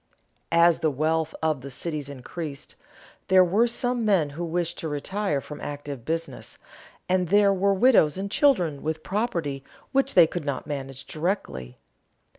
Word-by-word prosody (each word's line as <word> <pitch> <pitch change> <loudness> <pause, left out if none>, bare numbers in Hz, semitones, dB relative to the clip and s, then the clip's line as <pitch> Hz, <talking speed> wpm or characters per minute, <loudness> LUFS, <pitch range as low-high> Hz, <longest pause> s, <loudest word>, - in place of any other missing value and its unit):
As 170 0 +5
the 160 - +2
wealth 155 +3 -1
of 155 -4 +1
the 140 - -8
cities 150 +1 -4
increased, 140 +2 -7 0.5
there 185 -1 +6
were 205 +7 +3
some 245 0 0
men 185 -9 +2
who 165 +5 -5
wished 170 0 -2
to 160 - -3
retire 150 +2 -1
from 150 +2 -9
active 145 -4 -6
business, 165 +1 -4 0.5
and 185 -1 +1
there 200 +2 +4
were 195 +1 +2
widows 190 - +4
and 200 +1 -4
children 185 - +2
with 160 0 -3
property 170 - -2 0.3
which 270 0 +1
they - - +9
could 170 +1 -5
not 140 -3 -3
manage 135 -2 -6
directly. 70 - -3
165 Hz, 155 wpm, -25 LUFS, 145-195 Hz, 0.5 s, they